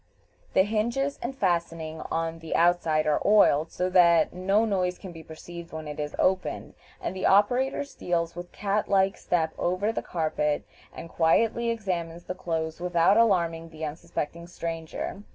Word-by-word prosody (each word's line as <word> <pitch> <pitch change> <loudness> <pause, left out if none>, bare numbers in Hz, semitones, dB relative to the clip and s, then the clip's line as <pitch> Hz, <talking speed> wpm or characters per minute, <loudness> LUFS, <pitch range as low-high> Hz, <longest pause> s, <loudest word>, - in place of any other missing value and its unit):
The 190 - +5
hinges 235 +7 -1
and 265 +3 -4
fastening 165 -4 -1
on 165 0 -2
the 165 -1 -4
outside 165 -3 +3
are 150 -1 +2
oiled, 165 -7 +4
so 180 - -1
that 170 -3 +5
no 195 +5 +2
noise 185 -4 0
can 190 - -9
be 165 -1 -10
perceived 170 +2 -10
when 155 -1 -6
it 150 0 -6
is 150 0 -4
opened, 185 0 0 0.3
and - - -4
the 185 - 0
operator 245 +8 +3
steals 170 -11 -2
with 175 0 -8
cat 205 +1 -1
like 195 0 +3
step 160 -3 -1
over 185 +5 0
the - - -3
carpet, 155 -3 -1 0.3
and - - -9
quietly 225 +9 +2
examines 175 -7 -3
the 185 - -4
clothes 160 -2 -3
without 180 +2 +3
alarming 170 -7 +2
the 160 -1 -6
unsuspecting 170 +1 -5
stranger. 165 +2 -5
175 Hz, 160 wpm, -27 LUFS, 165-195 Hz, 0.3 s, The